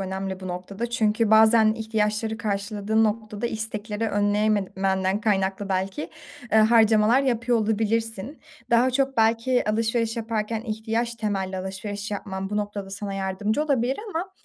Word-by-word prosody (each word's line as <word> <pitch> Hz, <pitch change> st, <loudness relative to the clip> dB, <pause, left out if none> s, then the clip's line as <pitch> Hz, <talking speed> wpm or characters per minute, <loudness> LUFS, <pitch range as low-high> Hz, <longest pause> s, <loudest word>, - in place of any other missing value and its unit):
önemli 190 Hz, 0 st, -4 dB
bu 185 Hz, -, -6 dB
noktada 195 Hz, +6 st, -5 dB
çünkü 220 Hz, -2 st, +1 dB
bazen 220 Hz, 0 st, +6 dB
ihtiyaçları 220 Hz, 0 st, -1 dB
karşıladığın 210 Hz, +1 st, 0 dB
noktada 215 Hz, +1 st, -2 dB
istekleri 220 Hz, 0 st, -3 dB
önleyememenden 205 Hz, -2 st, +1 dB
kaynaklı 195 Hz, -2 st, 0 dB
belki, 190 Hz, +8 st, -2 dB, 0.4 s
ııı, 220 Hz, 0 st, +6 dB
harcamalar 220 Hz, +2 st, +5 dB
yapıyor 240 Hz, -2 st, +1 dB
olabilirsin. 225 Hz, +3 st, -1 dB, 0.3 s
Daha 235 Hz, +2 st, +4 dB
çok 270 Hz, 0 st, 0 dB
belki 230 Hz, +3 st, +2 dB
alışveriş 225 Hz, +1 st, 0 dB
yaparken 225 Hz, -1 st, -2 dB
ihtiyaç 225 Hz, +1 st, -2 dB
temelli 195 Hz, -4 st, -2 dB
alışveriş 200 Hz, +2 st, -5 dB
yapman 195 Hz, -1 st, -4 dB
bu 210 Hz, -, -2 dB
noktada 205 Hz, -2 st, -4 dB
sana 200 Hz, 0 st, -5 dB
yardımcı 195 Hz, +7 st, -1 dB
olabilir 265 Hz, -3 st, +1 dB
ama, 360 Hz, +3 st, -3 dB
215 Hz, 130 wpm, -24 LUFS, 200-230 Hz, 0.4 s, bazen